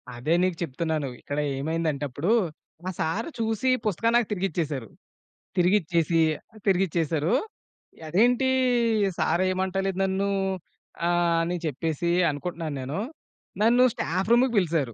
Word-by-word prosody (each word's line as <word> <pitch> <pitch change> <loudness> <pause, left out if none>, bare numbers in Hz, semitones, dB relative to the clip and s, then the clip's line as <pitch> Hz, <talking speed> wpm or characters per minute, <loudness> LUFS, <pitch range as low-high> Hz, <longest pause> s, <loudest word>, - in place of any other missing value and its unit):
అదే 140 +7 0
నీకు 185 -3 0
చెప్తున్నాను. 155 -1 -2
ఇక్కడ 145 - -5 0.2
ఏమైందంటే 155 -1 -1
అప్పుడు, 155 - -1 0.5
మా 185 - -3
సారు 205 - -1
చూసి 225 +3 0 0.2
పుస్తకం 220 +3 +1
నాకు 240 - +1
తిరిగిచ్చేసారు. 160 - -2 0.7
తిరిగిచ్చేసి 170 -3 +2 0.5
తిరిగిచ్చేసారు. 170 -4 +1 0.7
అదేంటీ, 245 - +3 0.7
సారు 170 +4 +2
ఏమంటలేదు 190 0 -1
నన్నూ 195 +1 0 0.8
ఆహ్, 175 -1 +2
అని 175 +1 -1
చెప్పేసి 160 +3 -1 0.2
అనుకుంటున్నాను 160 0 -4
నేను. 140 +8 -4 0.6
నన్ను 240 +3 +5
స్టాఫ్ 185 +6 -2
రూముకి 245 +1 +4
పిలిసారు. 160 - +1
175 Hz, 110 wpm, -26 LUFS, 155-195 Hz, 0.8 s, నన్ను